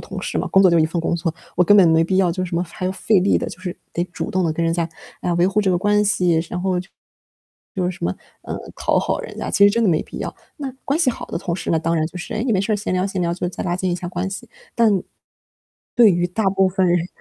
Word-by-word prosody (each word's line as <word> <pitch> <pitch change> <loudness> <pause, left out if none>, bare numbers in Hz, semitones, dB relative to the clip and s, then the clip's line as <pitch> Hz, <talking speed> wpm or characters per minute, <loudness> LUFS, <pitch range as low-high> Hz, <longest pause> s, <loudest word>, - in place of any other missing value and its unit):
同 - - -6
事 - - -2
嘛， - - -1
工 195 - +5
作 185 - +6
就 170 - +4
一 155 - +4
份 165 +2 -2
工 170 - 0
作， 165 -1 -2 0.2
我 180 - +4
根 205 - +6
本 190 -4 +7
没 160 0 +4
必 185 +2 +1
要 185 -3 +3
就 185 +2 -2
是 - - -5
什 - - -4
么， 170 - +1
还 185 +1 -5
要 185 - -1
费 205 +1 +2
力 190 +2 +3
地， - - -2
就 - - -10
是， 180 -1 -6 0.2
得 175 - -1
主 180 - -6
动 185 -1 +1
地 160 - +1
跟 165 +1 -1
人 165 - +1
家 170 -1 -1 0.3
来 175 - 0
维 175 +1 +3
护 200 +2 +1
这 200 - 0
个 180 - +2
关 205 +3 +2
系， 180 -5 +2
然 180 - -4
后 185 -2 +1 1.0
就 185 -3 -1
是 180 - +1
什 180 - -6
么， 90 - +1 0.3
嗯， - - -5 0.2
讨 - - +1
好 - - -1
人 - - -9
家， - - -3
其 200 - +5
实 - - +5
真 230 +3 +1
的 215 - +3
没 160 -3 +2
必 - - -9
要。 - - -4 0.2
那 275 -2 -4
关 280 +3 0
系 330 - +3
好 - - -7
的 - - -4
同 175 -1 -3
事 170 - -4
呢， 160 - +3
当 165 +1 0
然 155 -1 +1
就 180 - -8
是， - - -6
诶， 220 - -1
你 245 - +1
没 190 - +2
事 200 - -2
儿 - - +2
闲 205 -2 -3
聊 185 +1 +1
闲 190 -2 -3
聊， 170 0 0
就 175 0 -2
再 175 - -6
拉 175 -1 0
近 185 0 -1
一 175 - -1
下 180 - -6
关 180 +2 -3
系， 190 - -7 1.5
但， 235 -2 +7
对 - - +7
于 175 -1 +1
大 210 +5 -2
部 195 0 +3
分 185 0 +1
人 175 0 +2
180 Hz, 330 characters per minute, -21 LUFS, 170-195 Hz, 1.5 s, 本